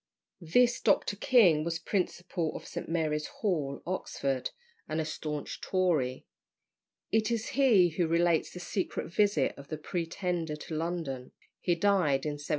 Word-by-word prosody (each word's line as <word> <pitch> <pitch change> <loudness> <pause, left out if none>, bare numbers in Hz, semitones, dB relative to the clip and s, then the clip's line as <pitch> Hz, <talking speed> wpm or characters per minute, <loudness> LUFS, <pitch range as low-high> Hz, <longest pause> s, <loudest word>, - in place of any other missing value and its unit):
This 240 +9 +3
Dr. 205 -1 +2
King 195 -9 +5
was 165 0 -1
principal 175 -1 -2
of - - -7
St. - - -6
Mary's 155 -2 0
Hall, 150 -10 -2
Oxford, 140 -7 -2 0.4
and 155 - -1
a 160 - 0
staunch 150 -1 -5
Tory. 160 -9 0 0.9
It 220 +1 +2
is 230 -1 -1
he 230 -10 +5
who 165 +1 0
relates 170 0 +2
the 180 - -9
secret 175 -1 -3
visit 200 -9 +3
of 140 - -11
the 155 - -4
Pretender 170 0 -2
to 155 +1 -7
London. 160 -6 -3 0.3
He 175 - +1
died 170 -7 +2
in 145 -1 -3
1763. 145 - -9
170 Hz, 150 wpm, -30 LUFS, 150-185 Hz, 0.9 s, King